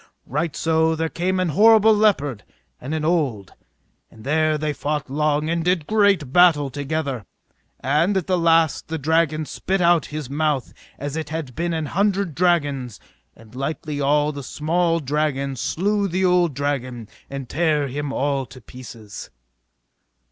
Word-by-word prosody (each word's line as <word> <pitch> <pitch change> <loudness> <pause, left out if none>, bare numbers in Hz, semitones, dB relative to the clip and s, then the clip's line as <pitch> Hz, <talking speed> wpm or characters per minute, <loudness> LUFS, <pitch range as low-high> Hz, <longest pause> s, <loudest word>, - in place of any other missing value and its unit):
Right 150 +3 -2
so 160 0 +1
there 160 0 -2
came 185 +3 -1
an 185 -2 0
horrible 220 +5 +6
leopard 145 - +1 0.4
and 140 +5 -4
an 155 -1 -2
old, 140 - -1 0.6
and 110 - -16
there 155 +2 +1
they 150 0 -2
fought 145 -2 -3
long, 150 +1 0
and 165 0 -1
did 180 -3 +1
great 200 -10 +2
battle 160 -6 +5
together. 140 -3 -3 0.6
And 155 +9 +2
at 185 - -1
the 185 - +1
last 165 -3 +2
the 160 - -3
dragon 155 +1 +1
spit 195 +6 -2
out 175 -2 +3
of - - -17
his 150 -3 -5
mouth 145 -1 -1 0.2
as 145 +1 -5
it 160 -2 -4
had 155 -5 -5
been 170 +6 -2
an 160 -1 -2
hundred 195 +1 0
dragons; 145 - 0 0.4
and 110 0 -18
lightly 145 +2 -4
all 145 +2 +2
the 145 -1 -7
small 165 +5 0
dragons 140 -3 -2
slew 200 +3 0
the 185 +1 0
old 175 -5 +2
dragon 130 -5 -3 0.2
and 140 -2 -6
tare 150 0 +1
him 145 +2 -4
all 140 -1 -1
to 130 - -13
pieces. 115 -3 -11
155 Hz, 160 wpm, -22 LUFS, 140-170 Hz, 0.6 s, horrible